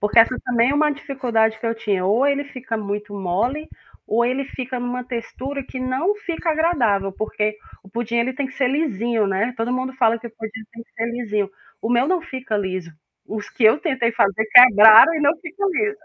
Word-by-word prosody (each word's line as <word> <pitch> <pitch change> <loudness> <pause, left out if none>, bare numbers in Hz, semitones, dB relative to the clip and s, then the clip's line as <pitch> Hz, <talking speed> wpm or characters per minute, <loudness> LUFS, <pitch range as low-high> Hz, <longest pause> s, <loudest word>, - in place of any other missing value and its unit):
Porque 210 +3 +2
essa 230 +3 +5
também 240 +1 +2
é - - 0
uma 300 0 +2
dificuldade 240 -6 -1
que 230 - -5
eu 230 - 0
tinha, 200 -4 -2
ou 220 +8 +2
ele 285 0 0
fica 255 -4 -6
muito 205 0 -5
mole, 205 - -2 0.4
ou 235 +2 +1
ele 255 +3 -1
fica 260 -1 -6
em 245 - -4
uma 245 0 -4
textura 255 +3 -6
que 260 - -9
não 260 +10 -1
fica 345 -4 -3
agradável, 240 - +1
porque 215 0 -3 0.3
o 195 - -17
pudim 235 +2 -4
ele 235 +2 0
tem 280 +1 -3
que 260 - -13
ser 260 -3 +1
lisinho, 240 -6 -1
né? 200 +6 -1
Todo 230 +2 -2
mundo 255 +1 -2
fala 230 -2 +2
que 235 - -10
o - - -9
pudim 220 0 -7
tem 230 0 -10
que - - -29
ser 225 - -3
lisinho. 215 -4 -2 0.3
O - - -4
meu 245 +3 +2
não 370 -1 +1
fica 260 -8 -5
liso. 185 -4 -4 0.4
Os 210 -1 -6
que - - -7
eu 220 +5 +6
tentei 260 -9 -1
fazer 220 -2 +1
quebraram 225 +3 +9
e 315 - -2
não 285 -1 +4
ficam 385 +4 -3
liso. 415 +3 -1
240 Hz, 215 wpm, -21 LUFS, 220-275 Hz, 0.4 s, quebraram